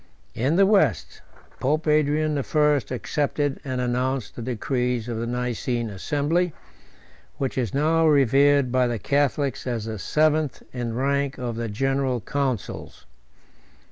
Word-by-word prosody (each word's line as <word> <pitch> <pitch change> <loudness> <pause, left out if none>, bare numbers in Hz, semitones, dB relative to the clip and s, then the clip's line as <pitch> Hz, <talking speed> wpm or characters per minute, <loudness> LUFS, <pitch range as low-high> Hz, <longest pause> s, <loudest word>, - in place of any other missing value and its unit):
In 135 +8 0
the 195 +2 +5
West, 155 - +1 0.4
Pope 155 +4 0
Adrian 155 0 +2
the 145 - 0
First 150 -1 +1
accepted 145 +2 -1
and 130 -2 -3
announced 125 0 -1
the - - -6
decrees 125 0 -1
of 115 -2 -3
the 115 - -3
Nicene 120 -1 -2
assembly, 150 - 0 0.8
which 135 -2 -2
is 120 -5 -1
now 160 +3 +2
revered 140 -1 +4
by 130 0 +3
the 120 -1 -2
Catholics 140 +3 0
as 115 -3 -2
the 110 -2 -5
seventh 155 +2 +1
in 120 -2 -3
rank 140 +2 0
of 120 -3 -4
the 115 0 -3
general 135 +3 0
councils. 130 -3 -4
135 Hz, 140 wpm, -24 LUFS, 120-145 Hz, 0.8 s, the